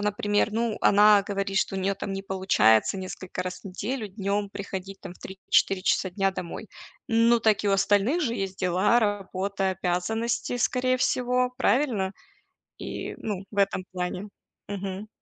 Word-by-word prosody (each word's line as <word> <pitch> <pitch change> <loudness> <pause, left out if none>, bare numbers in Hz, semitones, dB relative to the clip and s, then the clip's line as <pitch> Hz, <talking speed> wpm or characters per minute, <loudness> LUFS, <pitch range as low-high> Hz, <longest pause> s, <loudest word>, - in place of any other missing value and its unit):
например, 205 +1 0
ну, 230 0 -1
она 205 0 +6
говорит, 195 -1 -1
что 195 - 0
у - - -1
неё 195 +1 0
там 195 0 -5
не 195 - -4
получается 190 - +3
несколько 185 -1 -5
раз 185 0 -6
в - - -32
неделю 210 +4 -4
днём 200 +1 -2
приходить, 195 -1 -7
там, 180 -2 -7
в - - -19
3-4 190 0 0
часа 190 - +2
дня 195 +1 +1
домой. 180 -3 -7 0.4
Ну, 230 +1 +4
так 215 -2 +2
и 205 - +2
у - - +3
остальных 205 - +2
же 235 -4 0
есть 195 -2 -3
дела, 185 +6 +3
работа, 195 -2 -1
обязанности, 190 +7 -1
скорее 255 +1 +1
всего, 250 0 +1
правильно? 235 -9 +1 0.7
И, - - -5
ну, 200 -3 -4
в 205 - -11
этом 195 -1 +2
плане. 180 +3 -4 0.4
Мгм. 200 +1 -5
200 Hz, 160 wpm, -26 LUFS, 190-215 Hz, 0.7 s, она